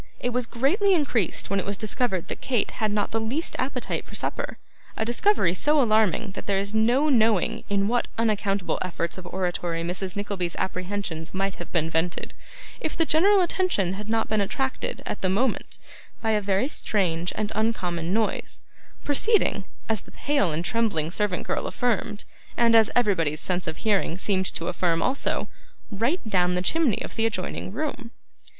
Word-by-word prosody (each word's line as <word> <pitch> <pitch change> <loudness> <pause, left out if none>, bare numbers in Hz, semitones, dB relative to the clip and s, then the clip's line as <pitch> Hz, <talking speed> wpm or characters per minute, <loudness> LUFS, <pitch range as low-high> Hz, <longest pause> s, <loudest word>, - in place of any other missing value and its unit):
It 245 - -1
was 245 -1 0
greatly 365 - +2
increased 245 - 0
when 200 - +2
it - - -3
was 200 0 -2
discovered 215 -4 -1
that - - -6
Kate 245 -6 0
had 215 -1 -1
not 205 -1 0
the 225 - 0
least 255 +10 -2
appetite 255 -1 -2
for - - -11
supper: - - -3 0.4
a 220 - 0
discovery 240 - +2
so 295 +10 +3
alarming 220 - +3
that - - -8
there 200 -1 +2
is 200 +2 -1
no 240 +7 +3
knowing 225 - +2
in 200 0 +2
what 240 +2 +1
unaccountable 205 -4 0
efforts 170 0 -3
of 180 - -9
oratory 175 -2 -2
Mrs. 180 +2 -2
Nickleby's 200 -4 -3
apprehensions 185 -3 -3
might 195 0 0
have 175 - -8
been 165 -2 +1
vented, 165 +2 -1 0.5
if 315 - -3
the 330 - +3
general 380 +6 +5
attention 345 - +1
had 210 +2 -6
not 225 0 +1
been 215 -1 +1
attracted, 265 +7 -2
at - - -4
the 185 - +1
moment, 230 +8 0 0.4
by 225 - 0
a 210 -1 +2
very 200 +5 +1
strange 180 - 0
and 215 0 -2
uncommon 180 -6 -1
noise, 220 +1 -1 0.4
proceeding, 290 - +2 0.2
as 220 -3 +1
the - - -17
pale 285 - +1
and 160 +3 -2
trembling 200 -9 0
servant 200 -1 -1
girl - - -1
affirmed, 220 -3 -1 0.3
and 235 -1 +4
as 225 -1 +6
everybody's 170 -10 +2
sense 180 +1 -2
of 160 - -3
hearing 200 -5 +1
seemed 190 -1 +1
to 165 - -4
affirm 175 -2 +1
also, 270 +2 0 0.4
'right 230 - 0
down' 180 -3 +2
the 180 - 0
chimney 300 - +2
of - - -7
the 225 - +1
adjoining 185 -3 -3
room. 255 0 -4
210 Hz, 175 wpm, -25 LUFS, 185-240 Hz, 0.5 s, as